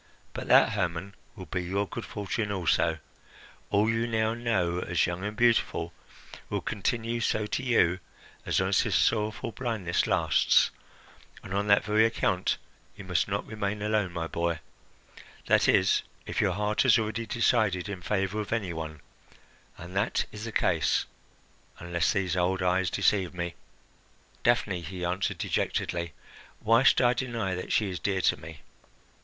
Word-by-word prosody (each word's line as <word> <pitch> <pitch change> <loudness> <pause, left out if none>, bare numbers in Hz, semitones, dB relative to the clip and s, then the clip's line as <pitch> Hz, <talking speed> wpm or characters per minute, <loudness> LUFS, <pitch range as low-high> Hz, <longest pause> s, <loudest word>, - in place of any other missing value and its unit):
But - - -6
that, - - +6
Hermon, 90 +3 -2 0.2
will 95 -4 -8
be 90 +3 -3
your 100 +3 -1
good - - -6
fortune 105 +1 -3
also. 85 -3 +1 0.7
All 105 +2 +3
you 115 +1 +1
now 110 -1 +1
know 110 -7 0
as 90 -1 +1
young 90 +2 -4
and 105 +1 -4
beautiful 115 -8 +2 0.6
will - - -2
continue 115 +3 -2
so 110 -1 0
to 105 - -2
you 105 -9 +2 0.4
as - - +1
long - - +1
as - - +4
this - - -1
sorrowful 110 +2 +1
blindness 110 -6 -1
lasts, - - +3 0.7
and 95 - -7
on 100 +1 0
that 100 0 +5
very 105 +2 +3
account 105 -5 +1 0.4
you 100 - -8
must 90 -4 0
not 100 0 -2
remain 105 -1 -3
alone, 105 -3 0
my 85 -1 -3
boy 85 0 -2 0.9
that - - +3
is, - - +4 0.2
if - - -1
your 95 -3 +2
heart 105 +2 0
has - - +5
already 110 +1 -2
decided 110 -6 +1
in 100 -3 -6
favour 100 +2 -1
of 105 - -7
any 105 -6 -1
one 80 -2 -6 0.8
and 90 +2 -10
that 100 +4 +1
is 105 +1 -7
the 115 - -5
case, - - +1 0.7
unless 85 -1 0
these 95 -4 0
old 90 +1 +1
eyes 90 0 +2
deceive 95 -3 +1
me." 85 -1 -3 0.9
"Daphne," 105 -7 +1
he 90 +2 -5
answered 90 +2 -1
dejectedly, 85 -1 -2 0.5
"why 115 +2 +4
should 135 - +5
I 120 -1 +4
deny 120 -6 -2
that 90 - -5
she 105 -3 +1
is 90 - -4
dear 95 -2 0
to - - +2
me? 80 0 -11
100 Hz, 160 wpm, -28 LUFS, 90-110 Hz, 0.9 s, that